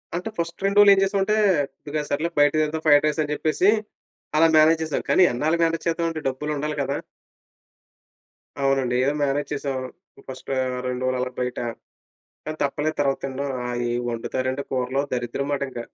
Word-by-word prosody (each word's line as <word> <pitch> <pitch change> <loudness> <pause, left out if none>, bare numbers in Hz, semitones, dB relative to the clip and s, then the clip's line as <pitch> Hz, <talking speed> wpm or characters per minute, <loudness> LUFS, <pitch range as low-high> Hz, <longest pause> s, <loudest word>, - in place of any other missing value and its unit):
అంటే 180 +5 -3
ఫస్ట్ 170 +3 -4
2 200 +1 +1
రోజులు 205 -1 +8
ఏం - - +1
చేసామంటే, 195 +2 +1 0.7
"సర్లే 155 +4 0
బయట 145 0 +5
తిందాం 155 +1 -2
ఫ్రైడ్ 145 0 +6
రైస్" 150 +1 0
అని 150 - -5
చెప్పేసి, 160 +6 +2 0.7
అలా 165 +1 +6
మేనేజ్ 160 +1 +5
చేసాం. 155 - -2
కానీ 190 - +5
ఎన్నాళ్ళు, 155 +7 +1
మేనేజ్ 165 0 0
చేద్దామంటే 165 -1 -1
డబ్బులు 150 +3 -4
ఉండాలి 150 +1 -2
కదా! 140 0 -1 1.7
అవునండి 135 -2 +1
ఏదో 140 +2 +1
మేనేజ్ 145 +1 -1
చేసాం 140 -2 -3 0.5
ఫస్ట్ 130 -1 -9 0.4
2 125 0 -3
రోజులు 130 0 0
అలా 125 0 -2
బయట, 125 0 -2 0.9
కానీ 155 0 -5
తప్పలేదు 150 +2 -1
తర్వాత 135 -1 +1
తినడం. 135 +1 -3
ఆ, - - -3 0.3
ఏం 120 - -1
వండుతారండి 130 +3 -2
కూరలు 130 +1 0
దరిద్రం 125 +2 -2
మాట 140 - -1
ఇంక. 120 - -6
145 Hz, 160 wpm, -23 LUFS, 130-160 Hz, 1.7 s, రోజులు